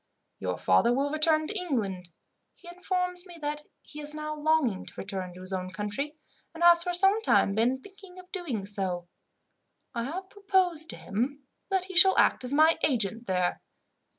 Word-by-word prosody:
"Your 90 -1 -3
father 95 - +3
will 275 +3 0
return 310 0 +3
to 425 - -5
England. 210 - -3 0.5
He 350 - -18
informs 360 0 -2
me 350 -1 -11
that 295 0 -3 0.2
he 300 - -11
is 295 +1 -3
now 305 0 -4
longing 300 -10 +1
to - - -11
return 190 -2 -5
to 180 - -11
his 185 +1 -4
own 185 -1 -3
country, 210 +10 -4 0.4
and 335 - -4
has 345 0 +7
for 355 +1 -1
some 390 +4 +4
time 195 - +4
been 235 +5 +1
thinking 385 +1 -15
of 365 0 -14
doing 300 - -4
so. 190 -4 -3 0.9
I 235 -2 -3
have 365 +8 -5
proposed 375 -5 +1
to - - -1
him 260 +8 -3 0.3
that 380 -2 0
he 375 -1 -9
shall 380 +2 +7
act - - +3
as 250 - 0
my 315 +3 +4
agent 230 -4 +1
there. 180 -2 0
300 Hz, 180 wpm, -28 LUFS, -, 0.9 s, has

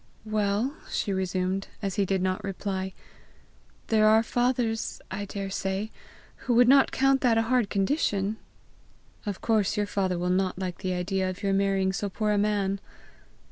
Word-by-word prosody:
"Well," 215 +4 0 0.2
she 200 - -1
resumed, 190 +1 -1 0.2
as 195 -1 -1
he 200 -1 +1
did 190 -1 0
not 185 0 -1
reply, 190 -1 -3 1.0
"there 215 -1 +4
are 220 +1 +5
fathers, 240 -2 0
I 200 +2 -3
daresay, 195 +1 -3 0.5
who 245 - -1
would 245 +1 +6
not 270 +1 +6
count 270 0 +3
that 235 -3 +3
a 225 - +3
hard 235 -2 +1
condition!" 200 -1 0 0.9
"Of 200 -2 -3
course 215 -2 +1
your 205 - +1
father 190 -3 -1
will 180 +1 0
not 185 0 +1
like 185 -2 -4
the 185 -2 -2
idea 185 +1 -1
of 185 +3 -7
your 195 -1 +1
marrying 195 -1 +1
so 200 +1 -2
poor 210 +2 -1
a 205 - +2
man!" 200 -1 0
200 Hz, 165 wpm, -27 LUFS, 190-220 Hz, 1.0 s, would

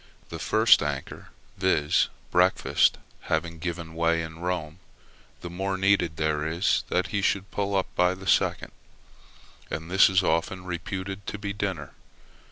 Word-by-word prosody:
The - - -6
first - - +5
anchor, 75 -2 -5 0.3
viz., 85 -6 +2 0.2
breakfast, - - +3 0.3
having 85 -1 -1
given 85 -1 -5
way 85 0 +1
in 80 0 -8
Rome, 85 -2 -3 0.6
the 85 - -6
more 95 +2 -2
need 100 +1 +4 0.2
there 75 -1 0
is 85 +4 +1
that - - 0
he 100 - -1
should 100 0 0
pull 100 -1 -1
up 95 - +2
by 90 +1 +3
the 95 +1 -11
second; - - +1 1.0
and 80 +3 -5
that 95 +1 +6
is 95 0 +3
often 90 +3 0
reputed 95 +3 -5
to - - -4
be 100 -1 -4
dinner. 95 -8 -4
90 Hz, 150 wpm, -26 LUFS, 80-95 Hz, 1.0 s, that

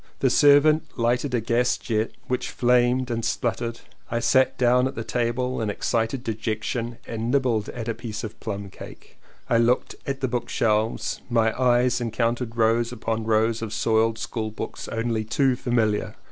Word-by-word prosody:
The 130 - +2
servant 145 +2 +4
lighted 120 +2 +1
a - - +2
gas 120 +2 +1
jet 110 -1 -1 0.2
which 125 - -2
flamed 125 +1 +2
and 115 -1 -2
sputtered 115 0 -2 0.3
and 115 - -1
I - - +1
sat 130 +2 +3
down 125 +1 +3
at 135 - -6
the 115 - -4
table 125 +1 -1
in 110 - -1
excited 115 +4 -1
dejection 115 +1 -3
and 115 0 -4
nibbled 125 -5 +1
at 115 -2 -6
a 115 - 0
piece 110 -2 -6
of 110 -1 -7
plum 100 -3 -5
cake. - - -12 0.3
I 115 - +3
looked 120 +2 +2
at 135 -1 -3
the 130 - +1
bookshelves 115 -2 0
and - - -29
my 115 -2 +2
eyes 125 -1 +2
encountered 115 0 -1
rows 115 +1 +2
upon 110 0 -3
rows 110 +1 +2
of 110 -1 -4
soiled 110 0 +2
school 110 -1 -3
books 110 +1 -6
only 115 -1 -1
too 130 +4 +1
familiar. 115 -4 0
115 Hz, 175 wpm, -24 LUFS, 110-125 Hz, 0.3 s, servant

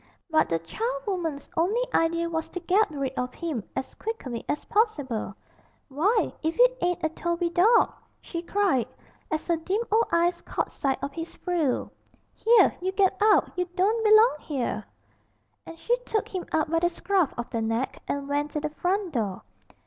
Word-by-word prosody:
But 315 - +3
the 165 - +2
charwoman's 365 - -3
only 390 +9 +2
idea 335 +1 +2
was 320 -1 -3
to 360 - -5
get 375 +5 +2
rid 275 -3 -3
of 250 -1 -3
him 315 - -3
as 265 - -4
quickly 265 - -5
as 295 - -2
possible. 370 - 0 0.5
'Why, 385 - +1
if 320 +1 -1
it - - +5
ain't 355 -1 0
a 315 - +2
Toby 340 +1 -2
dawg!' 415 +8 +4 0.3
she 335 - -5
cried, 360 - +1 0.4
as 310 - -2
her 340 -1 +1
dim 385 +8 -1
old 450 +2 +3
eyes 345 +1 +2
caught - - -3
sight 270 -1 -1
of 275 0 -3
his 330 +2 -6
frill. 335 -8 -1 0.4
Here, 465 +1 +5
you 375 +1 0
get 385 -1 +2
out; 425 0 +4
you 360 0 0
don't 425 +5 +2
belong 430 -3 +6
'ere!' 240 -7 -2 0.8
And 330 - -9
she 475 +8 +1
took 450 -4 -2
him 370 -2 -5
up 310 -1 +1
by 330 - +3
the 345 +1 +2
scruff 355 -2 +1
of 240 - -5
the 230 - -1
neck 225 +3 -2
and 280 0 -2
went 290 +1 -1
to 300 - 0
the 300 0 -3
front 370 +3 -1
door. 205 -7 -2
340 Hz, 180 wpm, -26 LUFS, 285-400 Hz, 0.8 s, belong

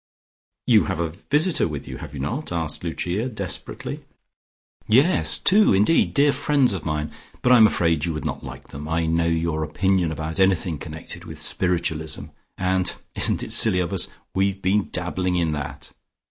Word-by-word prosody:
"You - - +4
have - - -3
a 85 -1 -1
visitor 150 - +1
with 75 -3 -6
you, - - -7
have - - -9
you - - -6
not?" 125 - -3
asked 80 -3 -3
Lucia 90 +7 -2
desperately. 100 -6 -5 0.8
"Yes! 135 +11 +4
Two, 205 - +5
indeed, 105 +12 +2
dear 145 +1 +4
friends 140 -6 +2
of 95 - -5
mine. 75 -1 -2 0.3
But 125 - +3
I 125 - +8
am 110 -2 +8
afraid 85 -6 0
you 85 - -2
would 75 - -5
not - - -4
like - - -10
them. 75 +2 -8
I 80 0 0
know 85 +1 +1
your 80 -1 0
opinion 90 +2 0
about 80 +2 -5
anything 95 -4 +1
connected 80 +1 -8
with - - -9
spiritualism, 80 -4 -2 0.3
and 95 -1 0 0.2
isn't - - +2
it - - -5
silly 100 -5 +5
of 90 +1 -2
us? 95 - +1 0.3
we've 95 0 0
been 95 +2 0
dabbling 90 0 -1
in 85 -3 +1
that." 75 -2 -6
90 Hz, 175 wpm, -23 LUFS, 80-100 Hz, 0.8 s, I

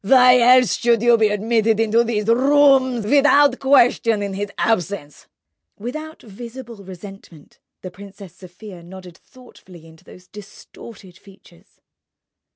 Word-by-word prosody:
"Why 250 +3 +4
else 250 0 +3
should 235 -1 0
you 240 0 +4
be 220 -1 +1
admitted 220 +1 -1
to 230 +2 +2
these 220 -3 -4
rooms 260 -1 +2
without 285 +1 +2
question 235 -5 +1
in 200 -1 -6
his 205 +1 -6
absence?" 190 -8 -4 0.5
Without 310 +8 -9
visible 235 +2 -12
resentment, 190 -4 -15 0.2
the 185 - -9
Princess 195 -1 -14
Sofia 185 0 -14
nodded 180 0 -14
thoughtfully 185 -9 -19
into 160 0 -20
those 180 - -18
distorted 200 -1 -15
features. 190 -3 -23
215 Hz, 125 wpm, -18 LUFS, 190-245 Hz, 0.5 s, Why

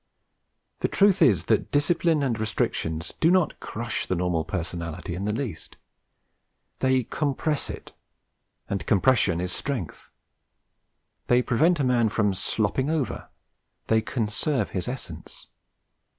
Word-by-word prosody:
The - - +1
truth 195 -1 +3
is 115 - +4
that - - +1
discipline 160 +1 +2
and 120 -5 0
restriction 80 -6 -1 0.2
do 165 - +4
not 185 -2 +2
'crush' 120 +1 -4
the 95 - 0
normal 90 -2 0
personality 85 0 -4
in 95 +3 -4
the 105 - 0
least. 110 - -5 1.0
They 130 -1 +2
compress 150 +4 -1
it; - - -8 0.8
and 100 - -2
compression 100 -5 +3
is 90 +1 -2
strength. 125 - -4 1.2
They 125 +1 +4
prevent 155 +8 +3
a - - +2
man 120 -3 +3
from 105 -2 +1
'slopping 110 +8 0
over'; 155 -7 -2 0.6
they 110 0 +4
conserve 120 +5 -1
his 90 +2 -3
essence. 120 -11 -7
115 Hz, 125 wpm, -26 LUFS, 95-140 Hz, 1.2 s, is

